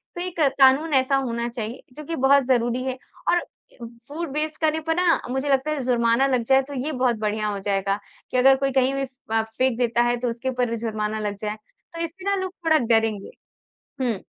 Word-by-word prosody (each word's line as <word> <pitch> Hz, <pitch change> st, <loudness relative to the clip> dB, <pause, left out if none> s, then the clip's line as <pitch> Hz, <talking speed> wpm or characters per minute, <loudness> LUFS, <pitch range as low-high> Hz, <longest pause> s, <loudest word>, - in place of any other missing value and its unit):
तो 350 Hz, -, -4 dB
एक 360 Hz, -1 st, -5 dB, 0.2 s
कानून 275 Hz, +4 st, +5 dB
ऐसा 265 Hz, 0 st, +3 dB
होना 235 Hz, -3 st, -1 dB
चाहिए 230 Hz, 0 st, -6 dB, 0.2 s
जो 305 Hz, -, -7 dB
कि 330 Hz, -, -3 dB
बहुत 275 Hz, 0 st, +4 dB
ज़रूरी 245 Hz, 0 st, +1 dB
है। 260 Hz, -1 st, -3 dB, 0.3 s
और 350 Hz, -, +4 dB
अ, 240 Hz, -7 st, -13 dB, 0.2 s
फूड 320 Hz, +1 st, -5 dB
वेस्ट 305 Hz, 0 st, -2 dB
करने 315 Hz, 0 st, +2 dB
पर 325 Hz, -, +2 dB
ना 355 Hz, -2 st, +3 dB
मुझे 265 Hz, +2 st, -1 dB
लगता 275 Hz, +3 st, +2 dB
है 300 Hz, -, -2 dB
ज़ुर्माना 235 Hz, +1 st, +2 dB
लग 255 Hz, -3 st, +1 dB
जाए 265 Hz, +1 st, +5 dB
तो 285 Hz, +2 st, -9 dB
ये 310 Hz, -, -2 dB
बहुत 255 Hz, -3 st, +1 dB
बढ़िया 215 Hz, 0 st, -1 dB
हो 200 Hz, -1 st, -3 dB
जाएगा। 195 Hz, 0 st, -1 dB, 0.3 s
कि 255 Hz, -, 0 dB
अगर 270 Hz, +2 st, +6 dB
कोई 270 Hz, 0 st, 0 dB
कहीं 265 Hz, 0 st, +2 dB
भी 275 Hz, 0 st, -1 dB
फ़ 255 Hz, -3 st, -11 dB
अ, 225 Hz, -, +3 dB
फ़ेंक 230 Hz, +2 st, -1 dB
देता 240 Hz, -1 st, +2 dB
है। 240 Hz, 0 st, +1 dB
तो 245 Hz, -, -1 dB
उसके 235 Hz, +3 st, -3 dB
ऊपर 245 Hz, -2 st, -1 dB
ज़ुर्माना 220 Hz, -1 st, -2 dB
लग 205 Hz, -1 st, -3 dB
जाए। 210 Hz, 0 st, -2 dB, 0.4 s
तो 335 Hz, -, -5 dB
इससे 350 Hz, +3 st, -7 dB
ना 400 Hz, -, +2 dB
लोग 375 Hz, -, -4 dB
थोड़ा 315 Hz, -1 st, +5 dB
डरेंगे। 225 Hz, -5 st, +1 dB, 0.7 s
हुँ। 235 Hz, -7 st, 0 dB
255 Hz, 220 wpm, -24 LUFS, 230-280 Hz, 0.7 s, अगर